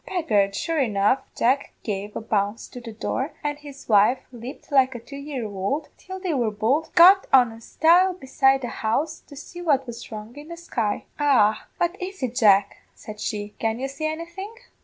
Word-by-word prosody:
"Begad, 210 - +1
sure 330 -2 -1
enough, 220 +1 +2 0.2
Jack 260 +4 +1
gave 205 -1 -4
a - - -3
bounce 205 0 -1
to 245 - -9
the 230 -1 -8
door, 260 +6 -3
and 290 0 -2
his 285 -2 -12
wife 215 +4 +4
leaped 250 +5 -10
like 260 -2 +3
a - - -5
two 240 +5 -12
year 280 -4 -5
ould, 210 +9 -3
till 375 +1 -9
they 370 -3 -2
were 240 -5 +1
both 225 +10 0
got 370 +3 +7
on 250 -3 +6
a 225 0 -12
stile 350 +8 +3
beside 270 -3 +2
the 245 - -3
house 300 +9 -1
to 285 - -15
see 350 +5 -9
what 285 -6 +2
was 240 -1 -9
wrong 215 +2 -8
in 295 +1 -10
the 340 0 -8
sky. 230 -11 -2
"'Arrah, 250 -8 +4 0.2
what 345 +1 0
is 375 -4 -6
it, 245 -2 -1
Jack,' 205 -5 +4 0.2
said 210 -1 -10
she; 210 -1 -4
'can 225 0 -1
you 265 +2 -3
see 275 +3 -4
anything?' 340 +7 -6
265 Hz, 200 wpm, -24 LUFS, 220-310 Hz, 0.2 s, got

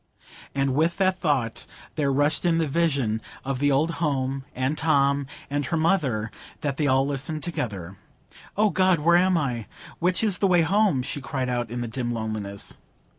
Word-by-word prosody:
And 135 -1 +1
with 160 +5 +1
that 185 -1 +2
thought 135 -9 -1 0.3
there 145 -3 0
rushed 145 +3 +1
in 170 -2 +3
the 165 - +2
vision 140 -8 0 0.2
of 135 -1 -2
the 145 0 +3
old 150 +5 +2
home, 135 -3 -1
and 130 +4 0
Tom, 140 -3 +2 0.2
and 145 +1 -1
her 165 - 0
mother,—they 150 - -1
had 145 +2 -1
all 135 0 +3
listened 145 +2 -3
together. 100 - -4 0.6
"O 210 0 +3
God, 185 0 +3
where 170 +3 +4
am 185 0 +3
I? 125 -8 -2 0.3
Which 180 +4 +1
is 205 -4 +2
the 195 - +3
way 175 -2 +4
home?" 190 -6 +2
she 140 +2 -3
cried 130 -1 -3
out, 120 -2 -1
in 120 +1 -4
the 120 - -3
dim 120 +1 -3
loneliness. 110 -3 -3
140 Hz, 175 wpm, -25 LUFS, 130-165 Hz, 0.6 s, where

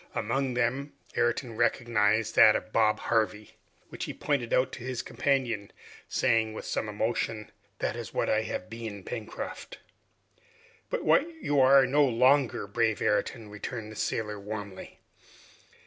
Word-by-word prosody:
Among 125 +3 -1
them, 130 +4 -1 0.2
Ayrton 120 0 0
recognized 110 -2 +1
that 110 - +8
of 110 - -4
Bob 110 -1 +3
Harvey, 110 -2 0 0.4
which - - -5
he - - -6
pointed 140 -6 -1
out 130 +1 +2
to 125 - -8
his 125 -1 -3
companion, 120 -8 -1 0.4
saying 110 -1 +2
with - - -7
some 110 - -2
emotion, 110 0 -2 0.3
"That 105 - -2
is 120 -1 -6
what - - -1
I 110 - +2
have 110 - -4
been, 110 -3 -7
Pencroft." 120 - -6 1.1
"But - - -2
what 315 - +4
you 145 - 0
are 135 +1 +7
no 145 +3 +3
longer, 130 0 +3
brave 110 +1 0
Ayrton!" 110 0 -1
returned 110 +1 -6
the - - -10
sailor 105 -1 -2
warmly. 100 -1 -7
115 Hz, 145 wpm, -28 LUFS, 110-130 Hz, 1.1 s, that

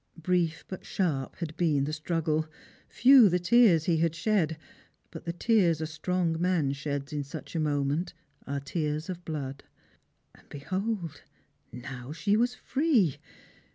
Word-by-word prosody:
Brief 165 -1 0
but 185 - -7
sharp 150 -9 -2
had 160 -3 -6
been 155 -5 +2
the 150 +2 -3
struggle; 160 0 -1 0.4
few 255 -4 +7
the 180 - +2
tears 180 -2 +5
he 165 0 +1
had 165 0 +1
shed; 170 -5 +1 0.5
but 165 -1 -9
the 170 - -1
tears 175 -3 +2
a 160 - -2
strong 165 +1 -1
man 170 -6 +1
sheds 145 +1 -4
in 145 -1 -2
such 140 +4 -9
a - - +1
moment 145 +3 -1 0.3
are 140 +1 -2
tears 150 +3 -3
of 175 -1 -8
blood. 140 -4 -5 0.7
And - - -22
behold, 185 +4 -4 0.5
now 125 +1 -8
she 170 +6 +1
was 240 +3 +1
free! 260 - +1
165 Hz, 150 wpm, -28 LUFS, 150-180 Hz, 0.7 s, few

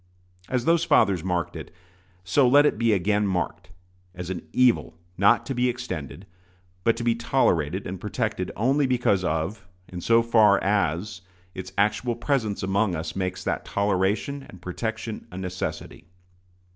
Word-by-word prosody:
As 125 -2 -1
those 170 0 +3
fathers 95 - +3
marked 90 -2 -2
it, - - -8 0.5
so 110 +9 +3
let 145 +4 +6
it 130 - +1
be 115 -1 +3
again 105 +1 +1
marked, 90 -1 -3 0.5
as 90 0 -5
an 90 -3 -4
evil 125 -9 +2 0.2
not 100 +3 +4
to 135 - -3
be 125 0 +1
extended, 100 - -6 0.6
but 115 +2 +2
to 120 - -4
be 120 -1 +3
tolerated 95 - 0
and 90 0 -6
protected 105 - -2
only 135 +5 +2
because 120 -7 +1
of 90 +4 -2 0.2
and 90 -2 -7
so 115 0 +4
far 110 -3 +5
as 95 0 0 0.3
its 95 0 -7
actual 105 +4 +1
presence 115 -5 -1
among 95 0 +1
us 80 0 -5
makes 95 -1 -3
that - - -2
toleration 100 +8 0
and 95 - -12
protection 110 +4 -5
a 90 - -8
necessity. 90 -6 -5
100 Hz, 155 wpm, -25 LUFS, 90-120 Hz, 0.6 s, let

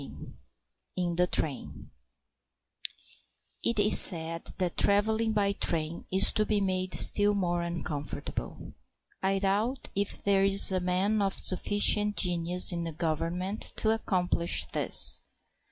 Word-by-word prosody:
XIV - - -13 0.6
IN 175 -2 -3
THE 180 +1 0
TRAIN 150 -6 -4 1.7
It 235 - -2
is 210 +1 +7
said 165 -1 +3
that 180 -2 -4
travelling 220 +2 +1
by 205 -2 -1
train 165 -4 -3
is 190 - +4
to 215 - -1
be 215 -1 -2
made 185 -1 -2
still 205 0 +6
more 175 -3 -2
uncomfortable. 170 -4 -7 0.5
I 195 +1 -1
doubt 205 +7 -3
if 200 +1 -4
there 195 -1 +1
is 195 0 +4
a 185 - -1
man 185 +4 -2
of 195 -1 -2
sufficient 205 +2 +2
genius 175 0 0
in 170 -1 -5
the 165 - -6
Government 170 +5 -5
to 220 - -1
accomplish 180 -5 -1
this. - - +3
190 Hz, 130 wpm, -27 LUFS, 175-205 Hz, 1.7 s, is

